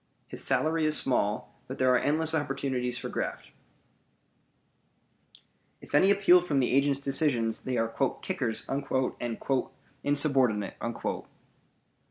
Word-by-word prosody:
His - - -3
salary 160 0 +1
is 155 0 +3
small, 105 -5 0
but 130 - -6
there 130 -1 +3
are 125 - +4
endless 155 +3 +1
opportunities 135 -4 -1
for - - -5
graft. - - -4 2.3
If - - -15
any 165 +7 +5
appeal 190 -3 +6
from 150 -6 0
the 125 - +1
agent's 140 +1 +3
decisions, 135 -5 0
they 130 -1 -3
are 115 0 +1 0.4
"kickers" 125 -12 -2
and 135 0 -3 1.2
"insubordinate." 135 -8 +1
135 Hz, 115 wpm, -28 LUFS, 125-155 Hz, 2.3 s, appeal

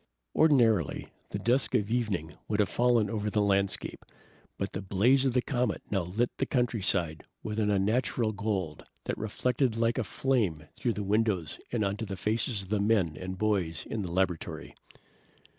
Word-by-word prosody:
Ordinarily, 115 - +3 0.2
the - - -3
dusk 125 +3 +1
of 105 0 +1
evening 100 -10 -1
would 105 -1 -1
have 105 - +3
fallen 120 -3 +3
over 105 -1 -2
the 105 - 0
landscape, 100 -1 0 0.5
but 100 -1 -3
the 95 - -3
blaze 115 +8 +3
of 130 - 0
the 125 -1 +2
comet 125 -2 -1
now 100 -2 +2
lit 100 +8 -1
the - - 0
countryside 95 - +1 0.2
with 110 0 -3
an 105 -1 +2
unnatural 110 +3 +1
gold 100 -7 -3 0.2
that - - -2
reflected 120 +2 0
like 115 +2 +1
a - - +1
flame 105 - 0
through 120 - -1
the 105 - -3
windows 100 -6 0
and 110 -4 +1
onto 100 +3 -2
the 95 -1 -5
faces 110 0 0
of 95 - -13
the 105 0 +1
men 100 -7 +2
and 95 +2 -6
boys 90 -6 0
in 110 - -3
the 90 - -4
laboratory. 90 -2 -2
105 Hz, 175 wpm, -29 LUFS, 95-115 Hz, 0.5 s, Ordinarily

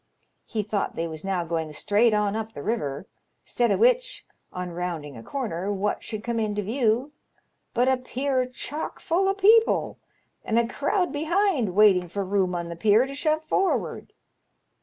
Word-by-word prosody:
He 215 -2 -2
thought 205 -1 -2
they 165 - -2
was 160 -1 -8
now 190 -3 -1
going 160 -2 -2
straight 210 +9 +2
on 210 -1 +1
up 225 0 -4
the - - -7
river; 150 -9 -2 0.4
'stead 240 -3 +1
o' - - +2
which, - - +2 0.3
on 180 -1 -5
rounding 170 -5 -4
a 115 - -9
comer, 205 - -3
what 205 +1 -1
should 215 -1 -5
come 235 -1 -1
into 210 -1 -1
view 235 +4 0 0.6
but 245 +2 +3
a 260 0 +3
pier 255 0 -1
chock 285 +4 -5
full 375 +4 +1
o' 390 - +1
people, 440 +3 +4 0.4
and 225 - 0
a 235 0 +3
crowd 355 - 0
behind 315 - +1
waiting 195 -4 +5
for 200 +2 -3
room 185 -2 0
on 170 -1 -3
the 170 - -6
pier 215 +6 +4
to 275 - -7
shove 310 +2 0
forward. 385 +4 -1
220 Hz, 175 wpm, -25 LUFS, 185-275 Hz, 0.6 s, waiting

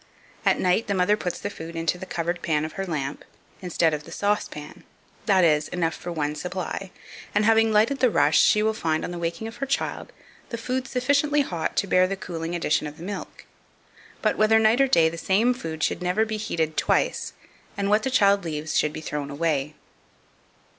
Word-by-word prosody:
At - - +4
night 185 +6 +2
the 200 - 0
mother 185 +3 +3
puts 180 -4 -4
the 205 - -5
food 165 -2 -8
into 165 +1 -1
the 190 - -7
covered 175 0 -2
pan 155 -1 0
of 155 - -6
her 195 0 -4
lamp, 145 -4 -3 0.4
instead 170 -3 +1
of 150 0 -3
the - - -13
saucepan 200 -7 -3 0.4
that 190 -3 +4
is, 150 -2 +3
enough 165 -2 -1
for 175 - -7
one 150 -3 -1
supply, 185 +4 -5 0.5
and, 210 - +3
having 225 0 +4
lighted 220 +6 +3
the 255 - +4
rush, 145 -6 +4
she 210 - +4
will 220 0 +2
find, 160 -6 -1
on - - -5
the 175 - -5
waking 170 +6 -3
of 225 - -9
her 275 - -3
child, 275 - -2 0.4
the 235 - -4
food 255 +3 -3
sufficiently 285 +4 +2
hot 175 - -3
to - - +2
bear 185 -1 +3
the 195 +1 -3
cooling 170 -3 -5
addition 155 -3 0
of 150 +1 -10
the 165 - -10
milk. 200 +2 -7 0.8
But, - - +1
whether 215 +1 +5
night 220 +3 +4
or 270 - +4
day, 165 -11 +4
the 165 +1 -4
same 215 +8 +2
food 160 -11 -5
should - - 0
never 180 +5 +1
be 220 0 -3
heated 160 -7 -2
twice, - - 0 0.4
and 200 0 0
what 210 +2 +3
the 265 - -1
child 200 -5 +4
leaves 155 -1 -4
should 150 - +2
be 155 - -6
thrown 150 -2 -4
away. 150 -1 -1
180 Hz, 210 wpm, -25 LUFS, 160-215 Hz, 0.8 s, whether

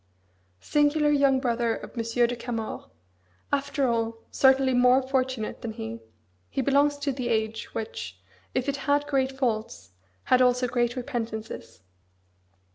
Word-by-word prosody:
Singular 295 - +2
young 280 -2 +4
brother 235 -3 0
of - - -10
Monsieur 230 +1 +1
de 245 +1 -2
Camors 230 -2 -5 0.7
after 280 -1 +1
all, 230 -1 0
certainly, 265 -1 +4
more 250 +1 +5
fortunate 260 -4 -2
than 225 -2 -4
he 110 - -6 0.5
he - - -4
belongs 285 +2 +3
to 285 0 -1
the 255 -2 -3
age, 220 -1 -1
which, 225 0 -5 0.4
if 255 +1 0
it 280 0 0
had 285 +1 +1
great 270 -2 +1
faults, 225 - -3 0.3
had 255 0 +4
also 250 0 +3
great 240 0 0
repentances. 225 - -5
250 Hz, 135 wpm, -26 LUFS, 230-275 Hz, 0.7 s, more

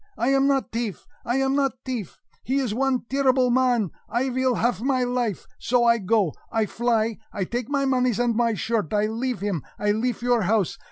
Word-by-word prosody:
I 240 - +1
am 275 0 +3
not 270 -2 +1
teaf! 230 -4 -4 0.2
I 240 - -1
am 270 0 +1
not 275 -2 +1
teaf! 245 - -5 0.3
He 260 - -1
is 255 -6 0
one 265 +1 +1
terreeble 260 -2 +2
mon! 245 - +2 0.3
He 260 +2 +1
vill 260 0 +1
haf 225 -3 0
my 260 0 +1
life! 245 -5 -1
So 245 0 +2
I 235 0 +4
go 200 -4 +1 0.2
I 225 -1 +1
fly 225 0 0
I 200 - -2
take 240 +5 -4
my 280 -1 +1
moneys 255 -4 +1
and 240 -2 +1
my 230 -1 +2
shirt 220 -6 -1
I 210 0 +2
leafe 235 +2 -2
him, 200 -6 -1 0.2
I 210 0 +1
leafe 235 +3 -1
your 245 -2 +3
house! 200 -1 0
240 Hz, 205 wpm, -24 LUFS, 220-260 Hz, 0.3 s, I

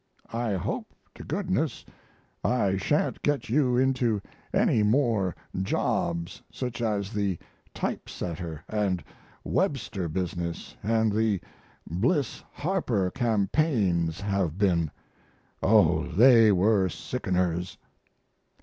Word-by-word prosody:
["I 115 -2 -1
hope 95 - -3 0.2
to - - -10
goodness - - -1 0.6
I 100 -6 +2
sha'n't 145 +10 0
get 145 -6 0
you 125 -1 +3
into 125 -4 +2 0.3
any 110 - +3
more 105 - +2 0.3
jobs 85 -2 -1
such 125 -2 -4
as 105 -2 -1
the 100 -4 0 0.3
type - - -3
setter 85 -2 -5
and 100 -4 0 0.4
Webster 105 - -1
business 85 0 -4
and 110 +1 +2
the 105 -2 +1 0.5
Bliss 125 - 0
Harper 125 - 0
campaigns 105 - +1
have 100 -5 -1
been. 85 -6 +2 0.7
Oh, - - +4
they 115 +5 +6
were 95 0 +3
sickeners." 90 -7 -2
100 Hz, 100 wpm, -27 LUFS, 90-120 Hz, 0.7 s, they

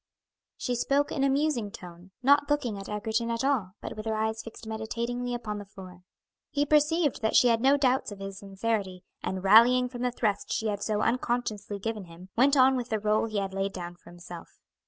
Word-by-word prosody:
She 250 - -2
spoke 275 +4 +1
in 275 - -1
a 275 - +3
musing 270 -6 0
tone, 175 -1 -11
not 285 +2 +4
looking 275 -7 0
at 195 -1 -8
Egerton 220 +2 -1
at 230 +2 -1
all, 250 -10 0
but - - -6
with 215 +1 -6
her 220 - 0
eyes 220 +1 -1
fixed 225 0 -11
meditatingly 235 +3 -3
upon 210 -3 -4
the 205 - -8
floor. 185 -2 -12 0.5
He 290 0 0
perceived 300 0 +2
that 220 - 0
she 245 - +6
had 230 -1 +2
no 275 +3 +5
doubts 260 -4 +1
of 205 - -8
his 195 0 -7
sincerity, 195 -2 -3 0.2
and 190 0 -3
rallying 240 +5 +6
from 245 -1 -7
the 250 - +1
thrust 210 -4 -1
she 220 - 0
had 205 -1 -3
so 210 -1 -1
unconsciously 230 -4 -1
given 215 -1 -4
him, 175 +2 -13
went 275 +4 +4
on 265 0 +6
with 250 -1 -3
the 220 - 0
rôle 215 +1 +1
he 215 - -3
had 195 -1 -2
laid 195 0 -2
down 175 -1 -6
for 175 - -17
himself. 175 -1 -10
220 Hz, 215 wpm, -28 LUFS, 195-250 Hz, 0.5 s, she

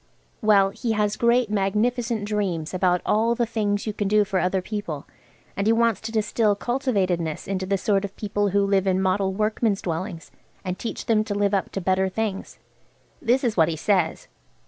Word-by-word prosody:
Well, 200 -3 +4
he 225 +2 -2
has 210 -1 0
great 235 -1 +2
magnificent 215 +3 0
dreams 190 -7 -2
about 180 -1 +1
all 225 +2 +2
the 235 - +1
things 210 -3 -1
you 215 - -2
can 205 -1 -2
do 210 +1 +4
for 195 -2 -1
other 185 +1 +1
people, 180 -7 -5 0.5
and 200 +1 -1
he 225 - +5
wants 230 -2 +2
to 225 - -5
distill 215 -1 +1
cultivatedness 195 - -1
into 190 -1 -2
the 195 0 +1
sort 200 0 +1
of 200 0 -6
people 205 -1 -1
who 200 +1 +2
live 195 -1 +1
in 185 0 +2
Model 190 +1 +1
Workmen's 215 +1 0
Dwellings, 165 0 -4 0.3
and 185 0 -3
teach 230 - -5
them 215 -2 +2
to 205 -2 -3
live 205 0 +1
up 195 - 0
to 195 - -3
better 190 +1 +1
things. 200 0 -4 0.6
This 250 +4 +2
is 235 -4 0
what 165 -2 +4
he 165 - -2
says. 190 +3 0
205 Hz, 190 wpm, -24 LUFS, 190-220 Hz, 0.6 s, he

